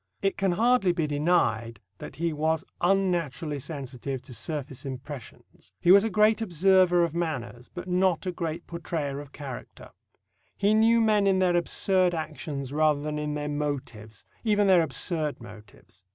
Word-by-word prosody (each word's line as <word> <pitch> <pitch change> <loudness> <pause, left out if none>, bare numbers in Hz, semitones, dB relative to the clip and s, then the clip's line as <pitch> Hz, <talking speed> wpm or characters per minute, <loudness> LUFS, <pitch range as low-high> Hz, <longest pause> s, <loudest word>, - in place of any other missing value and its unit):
It 195 - +1
can 195 -2 +1
hardly 225 -2 +3
be 165 -2 -1
denied 145 -8 0 0.2
that - - -9
he 165 0 -1
was 160 +3 0 0.2
unnaturally 175 -6 0
sensitive 135 -2 -5
to 130 -1 -11
surface 135 +2 -4
impressions. 130 - -10
He 175 - +4
was 200 +1 +8
a 225 - 0
great 215 +2 +3
observer 185 -2 +4
of 170 -2 -1
manners, 125 -8 -4
but 180 0 -8
not 180 -1 +1
a 185 - -1
great 170 -1 -4
portrayer 160 -4 -4
of 145 -1 -10
character. 135 -4 -9 0.7
He 205 +1 +2
knew 225 +2 +4
men 210 -2 +3
in 190 -1 +3
their 180 -2 +2
absurd 180 +1 +2
actions 145 -4 -5
rather 155 -1 +3
than 150 +1 -3
in 150 0 -3
their 150 0 -3
motives 135 -8 -5 0.2
even 210 -2 +2
their 185 -3 +5
absurd 155 0 -1
motives. 105 -4 -15
160 Hz, 160 wpm, -27 LUFS, 140-185 Hz, 0.7 s, was